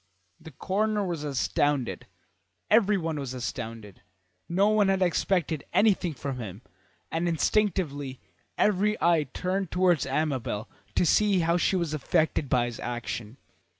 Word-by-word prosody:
The - - -11
coroner 205 +7 -1
was 170 -5 -3
astounded; 140 -5 0 0.6
everyone 195 -8 +3
was 130 -2 -5
astounded. 115 -5 -6 0.5
No 195 +4 +3
one 215 -2 +3
had 190 -1 +2
expected 170 -3 0
anything 185 -7 +3
from 135 +1 -4
him, 105 0 -7 0.5
and 165 +2 0
instinctively 160 -7 0 0.4
every 210 +1 +2
eye 165 -4 +3
turned 185 0 -2
towards 175 -6 +2
Amabel 135 -7 -1 0.3
to - - +3
see 200 +2 +3
how 170 +1 +2
she 185 - +1
was 170 -4 -1
affected 155 -1 0
by 125 -1 +3
his 120 -1 -6
action. 120 -1 -5
160 Hz, 130 wpm, -27 LUFS, 130-190 Hz, 0.6 s, everyone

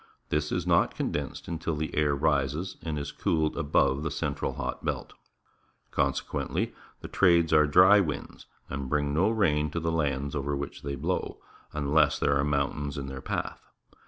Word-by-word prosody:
This 75 0 0
is - - -1
not - - +3
condensed - - -3
until 80 -1 -2
the 80 +1 -3
air 75 -1 +2
rises 75 +4 0
and 80 -2 -3
is 70 - -4
cooled 80 -2 0
above 70 -1 +2
the 80 - -2
central 70 0 -2
hot - - -4
belt. - - -3 0.8
Consequently, - - -1 0.3
the - - -6
trades 85 -3 +3
are 75 -1 +6
dry 95 +7 +7
winds 75 -7 -4 0.2
and 65 -1 -5
bring 75 0 0
no 90 +8 +3
rain 75 -9 +2
to 85 - -3
the 80 0 -1
lands 70 -3 -1
over 70 -1 -2
which 70 - -6
they 70 0 -4
blow, 80 +7 -2 0.3
unless 75 +1 +2
there 70 - +2
are 70 - +2
mountains 70 0 -1
in 70 - -4
their 65 0 -7
path. - - -4
75 Hz, 170 wpm, -28 LUFS, 70-80 Hz, 0.8 s, dry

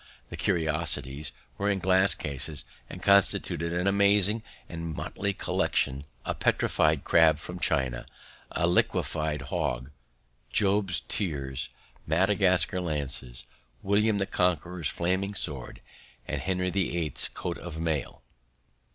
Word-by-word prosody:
The - - -6
curiosities 75 -3 -1 0.3
were 100 +1 +1
in 100 - +2
glass 95 +1 +6
cases 75 +1 -4 0.2
and - - -9
constituted 100 -4 +3
an 90 +1 -1
amazing 100 +2 +4 0.3
and 85 -1 -5
motley 100 0 -2
collection 70 -7 -1 0.2
a - - -1
petrified 75 -2 +1
crab 80 -2 +5
from 90 +3 -8
China, 65 -7 0 0.4
a 85 - 0
'lignified 80 -4 0
hog,' 65 -1 -2 0.6
Job's 95 -3 +2
tears, 70 -9 -2 0.4
Madagascar 90 +1 +3
lances, 70 -6 -4 0.4
William 105 +2 +2
the 100 - 0
Conqueror's 90 -3 0
flaming 95 +4 -1
sword, 70 -9 -3 0.5
and - - -3
Henry 90 -1 -1
the 95 -2 0
Eighth's 80 -3 +1
coat 85 -1 -5
of 85 -2 -7
mail." 80 -3 -2
85 Hz, 115 wpm, -28 LUFS, 75-95 Hz, 0.6 s, glass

